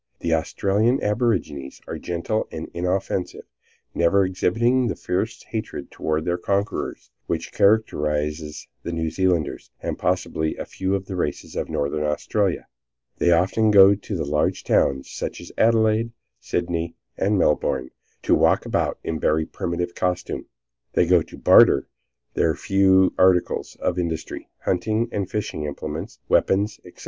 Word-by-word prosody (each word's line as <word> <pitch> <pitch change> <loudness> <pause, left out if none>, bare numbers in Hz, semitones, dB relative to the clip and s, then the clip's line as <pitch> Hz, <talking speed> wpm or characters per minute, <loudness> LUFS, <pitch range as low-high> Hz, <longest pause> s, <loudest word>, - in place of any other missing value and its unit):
The 85 - 0
Australian 100 +9 +1
aborigines 100 - -1
are - - -5
gentle 90 +6 -2
and 80 0 -6
inoffensive, 90 +1 -2 0.5
never 95 +3 +3
exhibiting 120 +7 +1
the - - -2
fierce 105 +5 -3
hatred 110 -1 -6
toward 80 0 -2
their 90 0 0
conquerors 100 +3 -2 0.2
which - - -3
characterizes 75 -7 +1
the - - -5
New 80 -1 -1
Zealanders, 90 -3 0
and - - -4
possibly 80 0 -1
a - - -5
few 95 +1 -2
of 95 -1 -3
the 95 - -6
races 80 -5 -3
of - - -3
Northern 70 +2 -1
Australia. 90 +6 0 0.5
They 85 - +3
often 95 +6 +3
go 100 -1 +8
to 100 0 -5
the 80 - -2
large 75 +1 0
towns, 65 -1 +2
such - - -5
as - - -10
Adelaide, 115 0 +3 0.3
Sydney 85 -1 -2 0.2
and 100 +1 +1
Melbourne, 65 -6 +1 0.3
and - - +4
walk - - +3
about - - 0
in 80 -1 -3
very 80 +1 +2
primitive 85 +1 -3
costume. 90 -1 -2 0.5
They - - +3
go 90 0 +4
to - - -10
barter - - +6 0.5
their 80 -2 +2
few 95 0 +3
articles 90 -1 +2
of 90 0 -1
industry, 80 -2 -4
hunting 110 +5 0
and 100 -2 -2
fishing 105 -7 -3
implements, 75 - -5
weapons, 100 +3 +2
etc. - - -15
90 Hz, 145 wpm, -23 LUFS, 80-100 Hz, 0.5 s, go